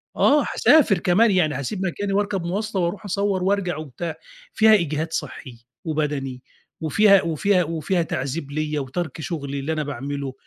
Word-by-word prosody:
آه، 290 +1 +4
هاسافر 255 - +4
كمان 200 +6 +3
يعني 155 -7 +2
هاسيب 185 +8 -3
مكاني 195 +2 -2
واركب 200 -3 0
موّاصلة 200 +1 -2
وأروح 175 +5 -2
أصوّر 200 -1 -1
وأرجع 190 -3 0
وبتاع، 155 +2 -6 0.4
فيها 220 0 +5
إجهاد 160 -3 0
صحي 120 -7 -6 0.2
وبدني 145 -5 -2 0.4
وفيها 200 +6 +5
وفيها 180 +3 +1
وفيها 165 +2 -1
تعذيب 140 0 -3
ليّا 150 0 -2
وترك 155 +3 -4
شغلي 140 -5 -4
اللي 155 +4 -2
أنا 155 -1 -2
باعمله. 140 0 -5
165 Hz, 150 wpm, -23 LUFS, 145-195 Hz, 0.4 s, فيها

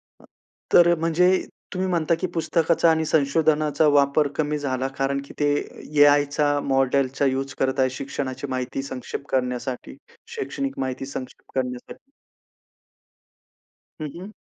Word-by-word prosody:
अ, - - -28 0.5
तर 175 0 +7
म्हणजे 165 +2 +3 0.5
तुम्ही 185 +1 -1
म्हणता 170 -2 +1
की 185 - 0
पुस्तकाचा 165 0 +2
आणि 160 0 +2
संशोधनाचा 155 0 +2
वापर 145 +1 +3
कमी 150 -1 0
झाला, 130 -2 -2
कारण 140 0 0
की - - -13
ते 145 - +3 0.5
एआयचा 145 0 +4
मॉडेलचा 135 0 +1
यूज 135 0 -1
करताय 130 0 +2
शिक्षणाची 135 -1 -4
माहिती 130 +1 -3
संक्षेप 135 +1 -6
करण्यासाठी, 125 0 -2 0.4
शैक्षणिक 275 -10 -4
माहिती 130 0 -3
संक्षेप 130 -2 -8
करण्यासाठी. 125 - -7 1.9
हं, 155 - -3
हं. 200 +4 -9
140 Hz, 120 wpm, -24 LUFS, 135-160 Hz, 1.9 s, तर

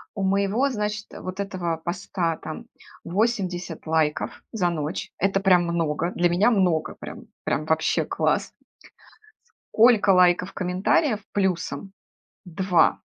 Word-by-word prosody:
у 200 - -2
моего, 200 +7 +1
значит, 210 -3 -3
вот 185 +1 -7
этого 185 -4 -2
поста 170 -1 -3
там 160 +9 -8 0.4
80 185 -4 -2
лайков 155 -2 0
за 185 -6 0
ночь. 155 -1 -4
Это 195 +1 +2
прям 185 -3 +4
много, 170 0 -1
для 175 0 +2
меня 180 +7 +3
много, 180 -7 +1
прям - - -9 0.2
прям 155 - -1
вообще 160 0 +1
класс. - - 0 1.2
Сколько 225 -3 +5
лайков, 180 0 +4
комментариев 195 - +1
плюсом? 190 0 -2 0.5
2. 180 0 +2
185 Hz, 120 wpm, -24 LUFS, 170-200 Hz, 1.2 s, Сколько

